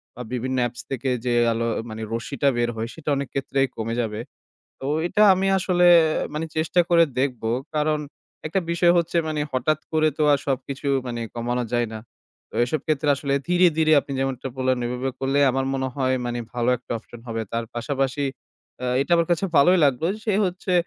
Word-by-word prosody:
বা 125 - -8
বিভিন্ন 130 +1 -2
apps 120 0 -9
থেকে 135 0 -2 0.2
যে 125 - +1 0.2
আলো, 115 +1 -1 0.2
মানে, 110 0 -7
রশ্মিটা 140 +4 0
বের 120 0 +1
হয়, 110 +1 -3
সেটা 160 -2 -6
অনেক 140 0 -2
ক্ষেত্রেই 135 0 0
কমে 115 +1 -3
যাবে। 110 -2 -3 0.6
তো - - -8 0.2
এটা 210 +4 +2
আমি 190 +1 0
আসলে, 180 -1 +2 0.5
মানে, 155 +2 -2
চেষ্টা 160 +3 +2
করে 170 -1 +6
দেখব। 130 -3 -1 0.3
কারণ 150 0 +1 0.5
একটা 180 +5 0
বিষয় 170 0 +4
হচ্ছে, 170 0 -1
মানে, 155 -1 -2
হঠাৎ 135 +4 +1
করে 155 0 +3
তো - - +1
আর 140 - +3
সবকিছু, 135 +1 -3 0.2
মানে, 120 -1 -4
কমানো 120 +1 -1
যায় 120 -1 +1
না। - - -5 0.5
তো - - -18
এসব 145 +5 -2
ক্ষেত্রে 155 -2 0
আসলে 140 0 -1
ধীরে, 180 +1 +5
ধীরে 155 -1 +4
আপনি 140 - -8
যেমনটা 135 -1 -2
বললেন, 130 0 +1
ওইভাবে 125 +2 -2
করলে 135 +1 +1
আমার 135 +1 -1
মনে 135 0 -1
হয়, 130 -2 +1
মানে, 120 0 -2 0.2
ভালো 120 0 0
একটা 125 - -8
option 115 +1 -14
হবে। 115 -1 -2
তার 115 0 -1
পাশাপাশি 135 +3 -1 0.6
আ - - -1
এটা 140 - -2
আমার 170 0 +2
কাছে 175 +2 +2
ভালোই 180 +6 +6
লাগলো, 140 +2 +2 0.2
সে 215 - +1
হচ্ছে, 185 +1 -3
135 Hz, 190 wpm, -23 LUFS, 120-155 Hz, 0.6 s, করে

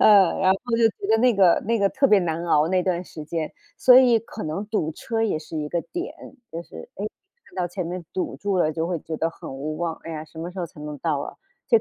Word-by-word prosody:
嗯， 200 -4 +6
然 190 - +4
后 - - 0 0.2
就 230 -1 +5
觉 200 - -7
得 220 - +5
那 245 -1 +4
个 185 -3 +5
那 230 - +2
个 200 - +3
特 275 +6 +2
别 210 -5 +6
难 170 0 -2
熬 155 -1 +3
那 185 0 +2
段 180 -1 0
时 155 -4 -9
间。 160 0 -3 0.2
所 250 -1 +7
以 245 -3 +6
可 220 -3 -8
能 160 +7 -3
堵 160 -8 -1
车 225 +7 -3
也 210 -8 +1
是 160 +1 -8
一 150 -1 -2
个 170 +1 0
点， 350 +2 -4 0.4
就 165 +1 -4
是 80 - -11
哎， 205 - -5 0.4
看 - - -20
到 180 -1 0
前 175 0 -4
面 175 0 -5
堵 185 - -2
住 200 -2 -1
了 155 -2 +2
就 165 +1 -1
会 175 -1 -1
觉 160 +1 -5
得 165 - +1
很 165 - -9
无 150 +3 -4
望， 165 0 -2
哎 165 - -6
呀， 155 0 -5
什 160 - -14
么 170 +2 -5
时 185 - -5
候 170 - -2
才 155 - -18
能 150 0 -6
到 155 -2 0
啊， 140 - -5 0.3
这 230 - +6
175 Hz, 290 characters per minute, -24 LUFS, 160-205 Hz, 0.4 s, 所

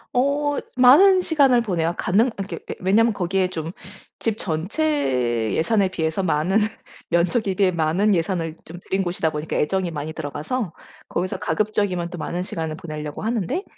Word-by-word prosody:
어 285 +3 +1 0.2
많은 365 +10 +7
시간을 275 -8 +4
보내요. 175 -5 -1
가능 215 +7 +2
이렇게 195 0 -5
예 - - -4
왜냐하면 220 +5 +3
거기에 190 0 0
좀 165 -2 -5 0.5
집 220 -2 -1
전체 155 - 0
예산에 195 +3 +2
비해서 160 +1 -1
많은, 175 +5 +2 0.5
면적에 185 +4 +1
비해 190 -2 +3
많은 175 +5 +2
예산을 165 -1 -1
좀 170 +2 -10
들인 190 0 +1
곳이다 175 -3 -1
보니까 150 +1 -3
애정이 185 +3 0
많이 155 0 -5
들어가서 160 - -3 0.4
거기서 185 +2 -2
가급적이면 185 -1 -1
또 180 - -7
많은 175 +3 -3
시간을 160 -4 -4
보내려고 155 -2 -6
하는데 225 - -1
185 Hz, 360 characters per minute, -22 LUFS, 160-220 Hz, 0.5 s, 많은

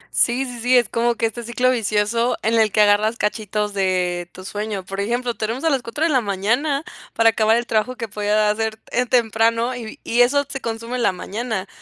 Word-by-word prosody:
Sí, 250 +3 +2
sí, 245 -2 -7
sí, 250 +2 +4
es 240 - +2
como 235 +1 +1
que 230 - 0
este 225 +1 -3
ciclo 240 +2 +1
vicioso 230 +1 0
en 225 - +1
el 215 -2 +3
que 210 - +3
agarras 210 +2 +3
cachitos 210 -1 -2
de, 180 -2 0
tu 185 - -12
sueño, 205 -1 -4
por 195 +1 -6
ejemplo, 240 +4 -1
te 215 -1 -3
duermes 235 +6 -4
a 325 - +2
las 270 -3 +1
4 235 +7 -4
de 330 - +3
la 260 -3 +3
mañana 235 +9 0 0.3
para 230 0 +5
acabar 220 0 +3
el 240 - -2
trabajo 230 +3 0
que 230 -2 -5
podías 210 0 +1
hacer 220 0 -2
en 250 +1 +1
temprano 230 0 +2
y 230 -3 -8
y 240 +1 +2
eso 285 +4 +3
se 270 -1 -6
consume 230 +2 -4
en - - -2
la - - +4
mañana. 210 +1 -4
225 Hz, 225 wpm, -21 LUFS, 210-245 Hz, 0.3 s, para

